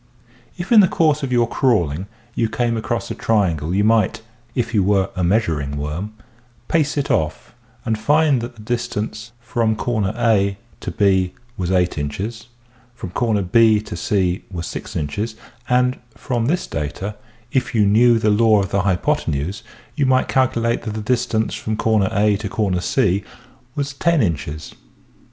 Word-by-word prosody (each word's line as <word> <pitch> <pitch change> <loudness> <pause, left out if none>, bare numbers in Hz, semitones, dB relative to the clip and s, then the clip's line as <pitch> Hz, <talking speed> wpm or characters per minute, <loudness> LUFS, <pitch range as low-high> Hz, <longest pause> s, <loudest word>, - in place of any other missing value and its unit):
If 180 +4 -6
in 230 - +8
the 195 - +7
course 155 -3 +2
of 135 -2 -3
your 120 -1 +3
crawling 95 - +1 0.3
you 115 -2 0
came 115 +1 0
across 115 +1 -3
a - - -1
triangle 85 -8 0
you 100 +3 +2
might 110 -1 +2 0.2
— 120 0 -33
if 120 -1 -1
you 105 - +3
were 95 0 +2
a 90 - -1
measuring 80 -8 0
worm 80 +9 -4 0.3
— 120 0 -34
pace 150 -3 +1
it 145 - 0
off 80 -1 -1 0.3
and 110 -1 -1
find 145 +2 +3
that 120 +1 -6
the 110 - -13
distance 115 -1 -3
from 115 -2 0
A 105 -1 +1 0.2
to - - -5
B 95 -1 +2 0.2
was 90 -5 -3
8 90 -4 +1
inches, 105 +11 -4 0.5
from 115 -7 -7 0.4
B 110 -1 +5
to 105 - -7
C 90 +1 0
was 85 -3 -5
6 - - -7
inches 100 +10 -3 0.3
and 125 +1 +2 0.2
from 120 -3 -2
this 175 +5 0
data, 95 +8 -4 0.4
if 130 -2 -1
you 105 -2 +4
knew 115 +4 +5
the 110 -1 +2
law 110 0 +4
of 95 - -4
the 100 - +2
hypothenuse, 90 -1 -1 0.3
you 145 -3 +1
might 130 0 +3
calculate 120 -3 +1
that 110 -2 -5
the 110 - -3
distance 115 -1 0
from 110 0 -3 0.3
A 105 0 +2
to 100 -3 -1
C 100 -3 +1 0.5
was 140 -1 -2
lo 170 - +4
inches. 80 - -1
110 Hz, 165 wpm, -20 LUFS, 95-120 Hz, 0.5 s, in